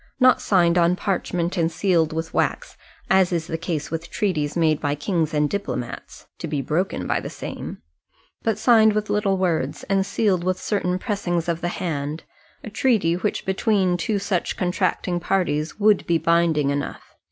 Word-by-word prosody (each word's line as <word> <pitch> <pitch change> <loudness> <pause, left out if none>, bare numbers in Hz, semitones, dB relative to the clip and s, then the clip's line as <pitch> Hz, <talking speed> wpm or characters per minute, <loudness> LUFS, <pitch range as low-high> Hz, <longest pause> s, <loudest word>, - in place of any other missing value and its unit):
Not 255 -1 +5
signed 175 -3 +3
on 170 +1 +3
parchment, 180 -2 -2
and 165 -1 +1
sealed 165 -2 +1
with 160 +1 -4
wax, - - -1 0.3
as 190 -1 +4
is 170 -2 -1
the 165 - -4
case 165 -3 -3
with 165 +1 -4
treaties 165 -8 -1
made 155 -3 +2
by 145 -1 0
kings 160 +1 -1
and 150 -2 +2
diplomats, 170 -9 -5
to - - -4
be 150 -1 -2
broken 155 +8 -1
by - - 0
the - - -6
same; - - -7 0.6
but 225 -2 0
signed 220 -1 +5
with 215 0 -1
little 205 -2 +1
words, 180 -4 -1
and 195 0 +1
sealed 190 -3 0
with 185 0 0
certain 180 -3 -1
pressings 185 -5 -2
of 170 -1 -1
the 175 - -1
hand, 155 -3 -3 0.4
a 215 - -7
treaty 215 -7 +2
which 185 +4 -2
between 190 -1 +1
two 200 +5 -1
such 195 -3 -2
contracting 180 -1 0
parties 170 -3 -1
would 210 -1 +3
be 170 -1 +3
binding 165 -4 +2
enough. 145 0 -5
175 Hz, 175 wpm, -23 LUFS, 160-195 Hz, 0.6 s, Not